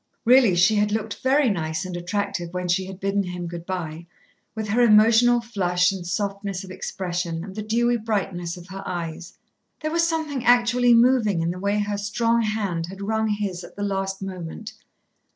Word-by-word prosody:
Really 240 -5 +6
she 180 +5 +4
had 210 0 +2
looked 215 -1 -3
very 270 +1 +3
nice 160 -5 -1
and 180 -1 -5
attractive 175 -1 -3
when 180 0 -2
she 185 +2 0
had 190 -1 -9
bidden 195 +1 0
him 180 -2 -5
good 170 0 -7
by, 170 -3 -5 0.5
with 220 -1 -3
her 230 +4 +2
emotional 230 +2 +5
flush 180 -6 +1
and 185 -3 -6
softness 200 0 -3
of 190 - -10
expression 175 -3 -4
and 190 0 -8
the 215 - -3
dewy 240 +3 +1
brightness 195 -6 -3
of 175 +1 -12
her 195 +1 -7
eyes. 170 -1 -6 0.4
There 310 0 -2
was 335 +1 +2
something 305 -6 -2
actually 245 0 +4
moving 230 -6 +4
in 165 +1 0
the 180 - -6
way 200 +2 0
her 205 -1 -1
strong 230 +3 +1
hand 200 -7 -2
had 190 +2 -10
wrung 220 +1 0
his 205 -4 -2
at - - -12
the 205 - -4
last 195 -1 -2
moment. 185 +2 -7
200 Hz, 190 wpm, -24 LUFS, 180-225 Hz, 0.5 s, Really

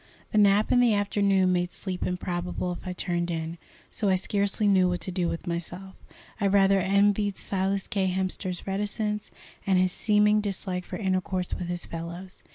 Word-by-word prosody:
The 215 - +3
nap 205 +1 +4
in 245 - +5
the 240 -3 +4
afternoon 200 -2 +2
made 175 0 0
sleep 185 -2 -3
improbable 180 0 -3
if 175 - -7
I 180 - -2
turned 175 -1 -2
in, 165 0 -4 0.3
so 205 - 0
I 190 - +4
scarcely 200 +2 0
knew 190 -2 +4
what 180 0 -1
to 185 - -2
do 175 -1 0
with 165 - -5
myself. 175 +2 -5 0.5
I 200 - +2
rather 195 0 +4
envied 200 +1 +2
Silas 195 0 -1
K. 195 -2 0
Hemster's 185 -1 -2
reticence, 210 +2 -2 0.4
and 190 -1 +4
his 185 0 +3
seeming 210 +1 +3
dislike 190 -3 -3
for - - -6
intercourse 185 -2 -1
with 180 - -3
his 175 0 -3
fellows. 170 +3 -7
190 Hz, 175 wpm, -27 LUFS, 180-200 Hz, 0.5 s, in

